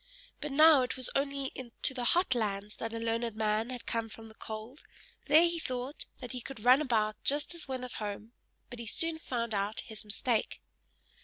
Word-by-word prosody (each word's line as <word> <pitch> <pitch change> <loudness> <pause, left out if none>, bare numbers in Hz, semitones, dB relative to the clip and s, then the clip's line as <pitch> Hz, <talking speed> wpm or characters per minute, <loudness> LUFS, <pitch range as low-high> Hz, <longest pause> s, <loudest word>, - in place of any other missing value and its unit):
But 295 - -4
now 305 0 +7
it 255 +1 -2
was 255 - +3
only 275 -1 -1 0.3
to - - +5
the 250 -2 -3
HOT 345 +5 +3
lands 210 -3 -2
that 225 - -4
a 230 - -4
learned 230 0 -1
man 220 +1 0
had 250 -2 -6
come 230 -1 -2
from 225 +1 -11
the - - -14
cold; 220 +5 -8 0.5
there 305 +3 +7
he 340 -1 +2
thought 255 0 -4
that 250 - -6
he 250 - -5
could 245 -3 -9
run 255 +4 +7
about 215 -6 0
just 290 +4 +2
as 340 -3 -6
when 260 -1 -4
at 250 - -6
home, 210 +1 -5 0.4
but 245 - -7
he 235 - -6
soon 330 +7 +1
found 235 -6 -3
out 205 +2 -1
his 220 -1 -8
mistake. 220 +2 -1
245 Hz, 205 wpm, -31 LUFS, 220-275 Hz, 0.5 s, now